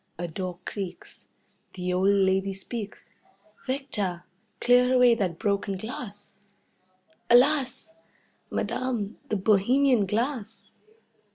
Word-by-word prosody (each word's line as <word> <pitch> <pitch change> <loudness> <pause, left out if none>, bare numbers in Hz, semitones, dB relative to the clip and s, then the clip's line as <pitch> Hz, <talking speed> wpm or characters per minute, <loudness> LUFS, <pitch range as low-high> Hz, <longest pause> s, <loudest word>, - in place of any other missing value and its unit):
A 175 +1 -3
door 180 +1 -5
creaks. 190 -4 -7 0.5
The 180 -1 -3
old 185 +2 +3
lady 195 -1 +2
speaks: 210 +2 -6 0.6
"Victor, 210 -10 -2 0.4
clear 250 +1 +4
away 250 -1 +6
that 190 -7 -1
broken 200 -1 -1
glass." 205 -2 -8 0.9
"Alas! 270 +4 +3 0.6
Madame, 235 -5 -2
the 215 - 0
bohemian 220 +4 +3
glass!" 225 +1 -3
205 Hz, 95 wpm, -26 LUFS, 190-250 Hz, 0.9 s, away